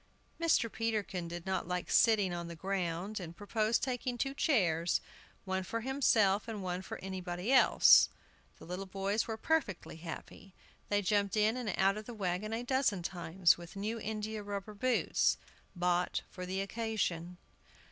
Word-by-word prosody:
Mr. 330 -8 +3
Peterkin 215 -6 -2
did 170 0 -6
not 190 -2 -1
like 180 0 -3
sitting 205 -6 +4
on 170 -1 -4
the 170 - -7
ground, 190 +2 -2
and 170 -2 -8
proposed 215 +2 0
taking 250 -1 -2
two 270 +3 -1
chairs, 175 - +2 0.5
one 190 0 -1
for 230 +5 -3
himself 225 -6 +2
and 215 -4 -5
one 180 0 -2
for 190 - -7
anybody 185 +2 -3
else. 260 - +7 0.5
The - - -12
little 180 +3 -5
boys 195 +3 -1
were 220 -1 -3
perfectly 225 - -1
happy; 175 +3 -9 0.3
they 205 0 +2
jumped 200 +1 +1
in 215 +2 +3
and 245 -5 -2
out 195 +1 +3
of 215 - -7
the 240 - -8
wagon 195 +1 -2
a 225 +2 -2
dozen 245 -8 +1
times, 175 0 +2
with 170 +1 -11
new 215 +4 -3
india 215 0 -4
rubber 205 +1 -5
boots, 250 +4 +2 0.4
bought 180 0 0
for 180 -1 -7
the 190 +1 -1
occasion. 195 -5 -2
200 Hz, 160 wpm, -33 LUFS, 180-225 Hz, 0.5 s, else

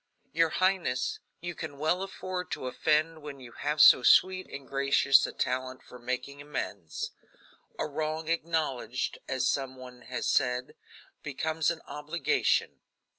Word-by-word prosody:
"Your 165 0 +3
highness, 185 -9 0 0.2
you 175 +1 -4
can 155 -3 -7
well 160 +5 +1
afford 185 -2 -5
to - - -5
offend 155 +4 +1
when 145 -2 -8
you 125 -2 -11
have 150 +4 -2
so 140 - +9
sweet 185 +8 +5
and 140 -1 -9
gracious 135 0 +4
a - - -6
talent 130 0 -2
for 125 - -13
making 125 +3 -4
amends. 100 - -5 0.7
'A - - -1
wrong 155 +1 -3
acknowledged,' 155 -7 -1
as 130 -1 0
some 130 0 -1
one 125 -1 -11
has 125 0 -4
said, 125 -2 +1 0.5
'becomes 160 +3 -1
an 170 -1 -3
obligation.'" 150 +1 0
145 Hz, 140 wpm, -29 LUFS, 130-160 Hz, 0.7 s, so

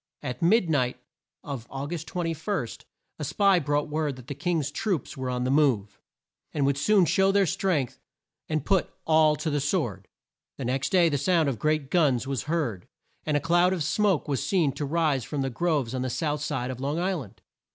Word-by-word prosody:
At 125 +3 -5
mid 185 +3 +4
night 130 -5 0 0.4
of 135 -5 -6
Au 135 +1 -4
gust 160 0 -5
21, 165 - -2 0.5
a - - -3
spy 190 +5 +3
brought 145 -1 0
word 150 -2 -1
that 125 -2 -12
the 140 - -5
King's 150 0 -1
troops 190 - -2
were 130 -2 -3
on 125 0 -1
the 130 - 0
move, 130 -9 +1 0.5
and 145 -3 0
would 140 0 +1
soon 200 +3 +4
show 190 +4 +3
their 200 0 +3
strength, 180 -7 -1 0.5
and 155 -3 -1
"put 195 -2 +1
all 155 -1 +4
to 155 +1 -3
the 145 - +1
sword." 125 - -1 0.5
The 135 - -4
next 135 +3 -1
day 180 -3 +4
the 145 -3 0
sound 165 -2 +2
of 120 -6 -4
great 155 -1 0
guns 140 -8 +3
was 135 -2 -3
heard, 130 - -1 0.4
and 150 -1 +2
a - - +1
cloud 175 +4 +3
of 175 -4 -1
smoke 195 +1 +1
was 140 -3 -1
seen 170 -8 +2
to 145 - -4
rise 150 -3 +1
from 140 +3 -3
the 135 - -2
groves 145 -3 0
on 130 - -2
the 130 - -1
south 150 +2 -1
side 130 -4 -2
of 125 - -7
Long 145 +3 -1
Isl 180 -3 -1
and. 100 - -19
150 Hz, 205 wpm, -26 LUFS, 135-170 Hz, 0.5 s, mid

